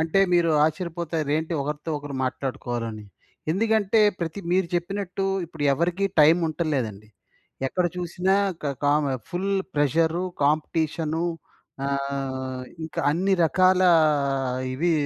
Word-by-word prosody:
అంటే 160 +4 +2
మీరు 170 -1 +4
ఆశ్చర్యపోతారు 160 -2 -2
ఏంటి 160 +2 -3
ఒకరితో 150 +3 -4
ఒకరు 145 -1 -7
మాట్లాడుకోవాలని. 120 -4 -4 0.5
ఎందుకంటే, 220 +1 +2 0.2
ప్రతి 170 +4 -3
మీరు 185 -1 +2
చెప్పినట్టు 195 +2 -2 0.2
ఇప్పుడు 160 -2 -8
ఎవరికీ 175 +6 0 0.2
టైమ్ 160 +4 +6
ఉంటంలేదండి. 130 -10 -2 0.6
ఎక్కడ 180 +6 0
చూసినా 180 +2 0 0.3
క 145 - -1
కామ 145 +1 +3 0.3
ఫుల్ 190 +3 -2 0.2
ప్రెషరు 160 +4 +2 0.2
కాంపిటీషను 155 +2 0 0.6
ఆహ్, 135 -2 -3 0.2
ఇంకా 160 - -4
అన్ని 190 +5 +1
రకాల 185 +3 +4 0.9
ఇవి 170 +5 +1
160 Hz, 110 wpm, -25 LUFS, 145-180 Hz, 0.9 s, టైమ్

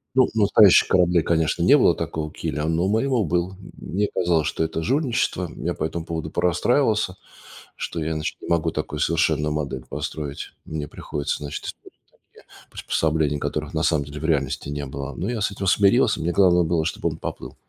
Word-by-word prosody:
Ну, 130 - +5
у 110 - +1
настоящих 100 -1 +6
кораблей, 90 -2 +3
конечно, 80 -2 +1
не - - +7
было - - +4
такого 75 -1 -4
киля, 75 +1 -3
но 80 +2 +1
у 95 - +1
моего 115 +1 +1
был. 90 +2 0
М 95 - -13 0.4
мне 105 +2 +1
казалось, 85 -4 +1
что - - -1
это 80 0 -3
жульничество. 120 - 0
Я - - -2
по - - -3
этому 80 +1 -4
поводу 80 -2 -4
порастраивался, 105 - +1 0.6
что 80 -2 -4
я, 80 - -2
значит, 75 - -4
не - - -9
могу 85 -1 +1
такую 75 -1 -4
совершенную 75 -2 +1
модель 70 -4 -4
построить. 75 -2 -5
Мне 75 -2 -5
приходится, 75 -1 -4
значит, 75 -1 -6
использовать - - -9 0.4
такие - - -19 0.2
приспособления, 75 -2 0
которых 75 +1 -3
на 80 0 0
самом 80 -2 +2
деле 75 +2 -8
в 80 - -5
реальности 70 -5 0
не 70 0 -4
было. 70 +1 -6
Но 95 +6 -3
я 120 -2 -2
с 105 - 0
этим 100 -1 -5
смирился, 100 +1 +4
мне 85 +2 -1
главное 90 -3 +4
было, 80 -1 0
чтоб 80 - -4
он - - 0
поплыл. - - -7
80 Hz, 195 wpm, -23 LUFS, 75-95 Hz, 0.6 s, не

